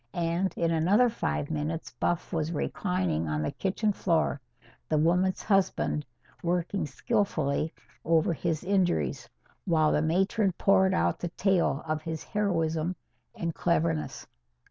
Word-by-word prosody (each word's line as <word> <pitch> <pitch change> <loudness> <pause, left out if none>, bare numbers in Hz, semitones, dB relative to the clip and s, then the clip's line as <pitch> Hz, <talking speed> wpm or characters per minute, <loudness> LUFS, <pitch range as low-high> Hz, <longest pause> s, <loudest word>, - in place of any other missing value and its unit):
And 175 +2 0
in 165 -1 +1
another 195 +10 +4
five 155 -9 -2
minutes 155 +1 -3
Buff 175 +2 -2
was 160 -1 -1
reclining 180 - -1
on 75 0 -1
the 75 - -1
kitchen 205 +2 0
floor, 160 -6 0 0.5
the 155 - +2
woman's 180 +4 +2
husband 195 -7 +1 0.3
working 175 +1 -1
skilfully 160 - 0 0.3
over 165 +1 +3
his 165 -1 -2
injuries, 175 -9 0 0.4
while 160 -4 +3
the 150 - +2
matron 190 +5 +1
poured 190 +1 +3
out 85 +1 +1
the 175 - -3
tale 180 -5 +1
of 155 -1 -2
his 160 0 -5
heroism 165 -4 0 0.4
and 170 -1 -3
cleverness. 165 -2 0
170 Hz, 130 wpm, -28 LUFS, 155-190 Hz, 0.5 s, another